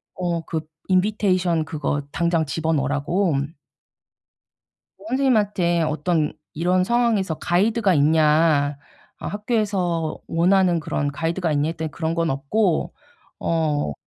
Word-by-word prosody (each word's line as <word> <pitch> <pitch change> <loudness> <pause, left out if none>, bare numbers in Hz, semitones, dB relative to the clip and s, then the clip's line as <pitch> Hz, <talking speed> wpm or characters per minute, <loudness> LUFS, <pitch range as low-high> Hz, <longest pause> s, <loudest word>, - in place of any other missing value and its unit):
어 175 -2 -2
그 160 - -2 0.3
인비테이션 185 -4 +1
그거 145 -2 -2
당장 170 -2 +1
집어 160 +3 -1
넣으라고. 145 +5 0 1.7
어 200 - -15
선생님한테 210 -10 +2
"어떤 155 0 0 0.2
이런 180 +3 +2
상황에서 225 -7 +1
가이드가 200 +3 +2
있냐? 150 -1 +3 0.4
아 - - -7
학교에서 200 -7 -1
원하는 175 0 +3
그런 145 -1 -2
가이드가 165 +2 -1
있냐?" 145 +2 +1
했더니 160 -1 -4
그런 160 0 -2
건 165 -1 +1
없고 160 +7 0 0.5
어 150 - 0
170 Hz, 265 characters per minute, -22 LUFS, 155-190 Hz, 1.7 s, 있냐